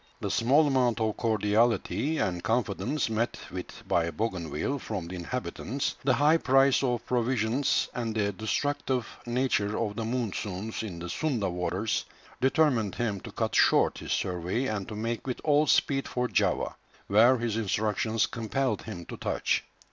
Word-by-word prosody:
The - - -2
small 140 +7 +4
amount 130 -4 +2
of 110 -1 0
cordiality 115 +7 +1
and 90 -8 -1
confidence 115 +4 0
met 115 +2 -1
with 90 0 -7
by 85 -1 +2
Bougainville 95 - -2
from 100 -8 -4
the 90 - -6
inhabitants, 125 +7 -3
the 130 -1 +3
high 150 +3 +5
price 135 -2 +4
of 125 -3 -1
provisions, 125 +2 +1
and 115 -3 -3
the 100 -2 +1
destructive 125 +4 -1 0.2
nature 120 -4 +1
of 105 -3 -2
the 115 - -3
monsoons 110 -3 -3
in 100 -6 -6
the 85 +1 -6
Sunda 110 - -1
waters, 90 +5 -1 0.4
determined 130 - +2
him 105 -5 -1
to - - -9
cut - - -2
short - - +4
his - - -6
survey 90 +7 -1
and 105 -6 -2
to 105 - -6
make 115 +4 -3
with 125 - -2
all 150 0 +3
speed 135 -1 +2
for 125 0 -1
Java, - - 0 0.3
where 115 +6 +5
his 115 -2 -2
instructions 110 +1 0
compelled 125 +3 -1
him 95 -6 -7
to - - -8
touch. - - 0
115 Hz, 155 wpm, -28 LUFS, 100-130 Hz, 0.4 s, high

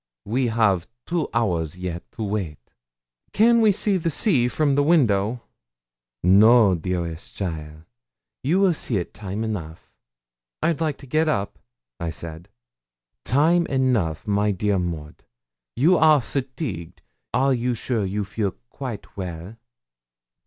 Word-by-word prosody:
We 125 +4 0
have 105 -6 +2 0.2
two 170 -3 -1
hours 90 -8 -1
yet 90 -1 -6
to 115 - -5
wait.' 95 - -4 0.6
'Can 230 +2 +5
we 215 -2 +5
see 200 0 +1
the 165 -1 -1
sea 145 - +3
from 145 +2 +1
the 145 - +3
window?' 120 - +2 0.8
'No, 105 +3 +6
dearest 85 -1 -4
cheaile; 80 -4 -5 0.6
you 165 +8 +2
will 195 -3 +4
see't 105 - -3
time 100 +1 -5
enough.' 85 -8 -6 0.7
'I'd 165 -2 +1
like 155 -3 0
to 140 - -13
get 155 +4 +1
up,' 100 -9 -2 0.4
I 85 - -2
said. 80 +2 -8 0.8
'Time 165 +7 +3
enough, 120 - 0
my 105 0 +1
dear 100 0 0
Maud; 80 -4 -5 0.5
you 165 +9 +4
are 155 -1 +6
fatigued; 130 - -5 0.3
are 135 +2 +2
you 125 0 0
sure 115 -1 -1
you 100 +2 -2
feel 100 0 -2 0.2
quite 125 -6 -7
well?' 90 +1 -6
110 Hz, 130 wpm, -23 LUFS, 90-140 Hz, 0.8 s, No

